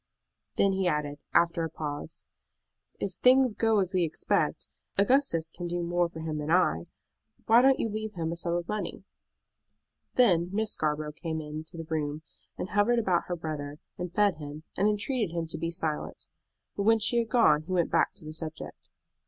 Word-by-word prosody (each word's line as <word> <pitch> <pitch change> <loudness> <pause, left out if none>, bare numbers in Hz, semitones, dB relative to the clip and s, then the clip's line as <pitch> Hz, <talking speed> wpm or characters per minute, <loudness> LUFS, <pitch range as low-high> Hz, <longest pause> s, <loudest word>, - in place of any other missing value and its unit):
Then 200 - +3
he 190 -1 0
added, 150 -3 -1
after 170 -1 +3
a 165 - -2
pause, 150 0 -5 0.7
"If - - -3
things 255 -1 +5
go 225 0 +2
as 190 0 -1
we 185 - +2
expect, 160 -1 0 0.3
Augustus 200 - +3
can 175 +1 -6
do 175 0 -2
more 175 0 +1
for 160 -1 -8
him 155 -1 -3
than 150 +1 -4
I. 120 - +2 0.6
Why 230 +2 +6
don't 270 +1 +5
you - - +1
leave 215 0 -4
him 165 -2 -2
a - - -2
sum 170 0 0
of 175 0 -2
money?" 210 -3 -4 1.1
Then 180 -9 +4
Miss 215 +1 0
Scarborough 150 0 -1
came 160 +1 -4
into 155 +2 -7
the 165 - -5
room, 155 -1 -2 0.3
and 190 - -4
hovered 210 +4 +3
about 185 -7 +1
her 175 - -3
brother, 150 -3 -5 0.2
and 180 -1 -4
fed 200 -3 +2
him, 150 0 -8
and 200 - +2
entreated 210 -3 -1
him 165 -1 -1
to 160 - -5
be 165 - -1
silent; 160 -3 -3 0.5
but - - -2
when 225 +3 +5
she 230 +2 +2
had 230 -1 -1
gone 155 -12 +4
he 160 - -9
went 175 -2 +1
back - - +2
to - - -8
the 155 - -6
subject. 160 -1 -6
170 Hz, 190 wpm, -28 LUFS, 155-205 Hz, 1.1 s, Why